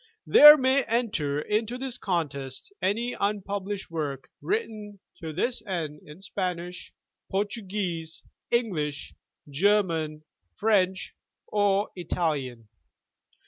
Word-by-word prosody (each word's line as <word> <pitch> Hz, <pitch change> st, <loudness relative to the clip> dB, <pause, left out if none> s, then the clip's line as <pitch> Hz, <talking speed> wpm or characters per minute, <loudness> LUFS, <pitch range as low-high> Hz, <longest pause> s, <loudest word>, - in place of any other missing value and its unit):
There 300 Hz, +1 st, +10 dB
may 265 Hz, 0 st, +3 dB
enter 205 Hz, -12 st, 0 dB
into 215 Hz, +8 st, -1 dB
this 255 Hz, -1 st, -5 dB
contest 145 Hz, -, -3 dB
any 230 Hz, +6 st, 0 dB
unpublished 200 Hz, -1 st, -3 dB
work 145 Hz, -5 st, -4 dB
written 215 Hz, -, -3 dB, 0.2 s
to 160 Hz, -1 st, -5 dB
this 235 Hz, -, -1 dB
end 155 Hz, -6 st, -3 dB
in 150 Hz, +6 st, -13 dB
Spanish, 180 Hz, -3 st, -4 dB, 0.4 s
Portuguese, 190 Hz, -5 st, -3 dB, 0.3 s
English, 165 Hz, -12 st, -1 dB, 0.3 s
German, 160 Hz, -2 st, +1 dB, 0.3 s
French 190 Hz, -3 st, +1 dB, 0.3 s
or 205 Hz, 0 st, +1 dB
Italian. 150 Hz, -, -2 dB
190 Hz, 95 wpm, -27 LUFS, 160-210 Hz, 0.4 s, There